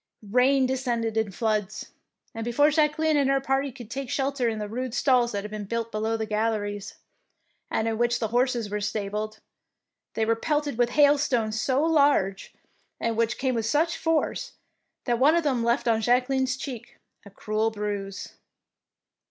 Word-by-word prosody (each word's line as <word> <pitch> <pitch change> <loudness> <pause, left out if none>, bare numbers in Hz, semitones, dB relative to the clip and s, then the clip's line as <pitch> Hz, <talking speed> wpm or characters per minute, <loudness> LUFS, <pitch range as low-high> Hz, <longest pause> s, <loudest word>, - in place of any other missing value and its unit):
Rain 260 +3 +4
de 255 - 0
scended 235 -4 -2
in 220 -3 0
floods, 215 0 -2 0.4
and 225 - -5
before 290 +6 +3
Jacque 300 0 +2
line 315 -1 +2
and 280 -2 +2
her 275 0 +3
party 270 +1 -1
could 235 -3 -12
take 270 0 -4
shelter 270 -3 0
in 220 - -3
the 210 -1 -4
rude 245 +3 -4
stalls 250 -3 +3
that 200 -1 -3
had 210 - -7
been 210 -1 -5
built 230 +2 -3
below 220 +1 -1
the 220 - -2
galleries, 210 -2 -2 0.7
and 220 - -1
in 225 0 -2
which 240 0 +2
the 225 -2 -2
horses 245 -1 +1
were 210 0 -3
stabled, 210 +1 -3 0.8
they 225 - +1
were 230 +1 +2
pelted 295 0 -1
with 240 -1 +3
hailstones 260 -6 +2
so 265 +3 +1
large, 285 -12 +2 0.5
and 230 -1 -1
which 230 0 0
came 260 -1 0
with 225 -2 -1
such 320 +7 +1
force, 325 +9 -1 0.5
that 240 -2 0
one 295 +5 +5
of 340 - +2
them 260 -6 0
left 235 +1 +1
on 225 -1 +2
Jacqueline^s 255 +2 +1
cheek 250 -5 -7 0.3
a 200 - -13
cruel 215 +2 -1
bruise. 205 -2 -5
235 Hz, 175 wpm, -26 LUFS, 215-270 Hz, 0.8 s, one